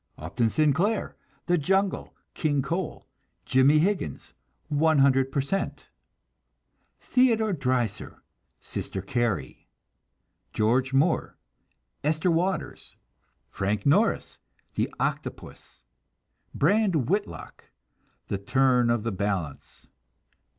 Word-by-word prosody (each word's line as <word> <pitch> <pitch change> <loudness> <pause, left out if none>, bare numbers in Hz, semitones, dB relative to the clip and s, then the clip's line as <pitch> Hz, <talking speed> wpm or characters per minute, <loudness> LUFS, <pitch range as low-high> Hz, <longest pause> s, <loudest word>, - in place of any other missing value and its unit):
Upton 100 +9 -1
Sinclair: 155 - +1 0.3
The 175 -1 +2
Jungle, 190 +5 0 0.2
King 145 -4 0
Coal, 170 +4 -4 0.4
Jimmie 130 +4 +4
Higgins, 170 - -1 0.4
100 140 -3 +3
Per 140 - +1
Cent. 195 +8 -3 1.1
Theodore 225 -5 +2
Dreiser: 125 - -2 0.4
Sister 95 - -5
Carrie. 120 0 -2 0.9
George 125 +5 +1
Moore: 145 +5 +1 0.7
Esther 155 +4 +1
Waters. 180 +3 -2 0.5
Frank 100 +2 -2
Norris: 195 +11 +2 0.3
The - - -1
Octopus. - - -5 0.7
Brand 195 - +2
Whitlock: 190 - -3 0.6
The 100 - -3
Turn 125 +2 +2
of 120 -2 +1
the 115 - -1
Balance. 95 -7 -4
140 Hz, 85 wpm, -26 LUFS, 120-175 Hz, 1.1 s, Jimmie